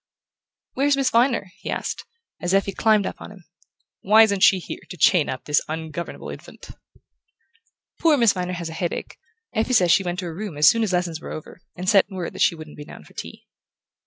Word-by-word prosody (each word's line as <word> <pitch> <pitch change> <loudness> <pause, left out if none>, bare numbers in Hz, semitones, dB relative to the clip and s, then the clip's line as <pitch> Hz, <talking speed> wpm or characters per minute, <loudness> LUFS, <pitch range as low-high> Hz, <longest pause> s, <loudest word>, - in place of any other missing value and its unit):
"Where's 280 +1 +2
Miss 275 -1 +1
Viner?" 235 -5 +2
he - - -7
asked, - - -4 0.4
as 175 +2 +1
Effie 195 0 +1
climbed 215 0 +2
up - - -6
on - - -9
him. 190 -5 -15 0.6
"Why 215 +3 +6
isn't 200 -3 +1
she 190 - +6
here 180 - -7
to 180 - -8
chain 170 0 +4
up 130 - -5
this 150 - +2
ungovernable 160 +1 -6
infant?" - - -12 1.3
"Poor 320 -3 +4
Miss 235 -5 +4
Viner 180 -1 -3
has 170 -2 -5
a - - -7
headache. 170 +1 -4 0.3
Effie 225 +2 0
says 180 -7 +4
she 195 - +5
went 175 -1 -3
to 185 - -4
her 170 - -5
room 190 -3 -6
as 150 - +5
soon 230 - +5
as 215 -4 0
lessons 175 -3 -1
were - - -8
over, 155 +3 -9
and 180 +1 -6
sent 195 0 +4
word 185 -4 -5
that - - -7
she - - +4
wouldn't 155 -2 -11
be 150 - -8
down - - -12
for - - -19
tea." - - -9
185 Hz, 215 wpm, -23 LUFS, 170-215 Hz, 1.3 s, Why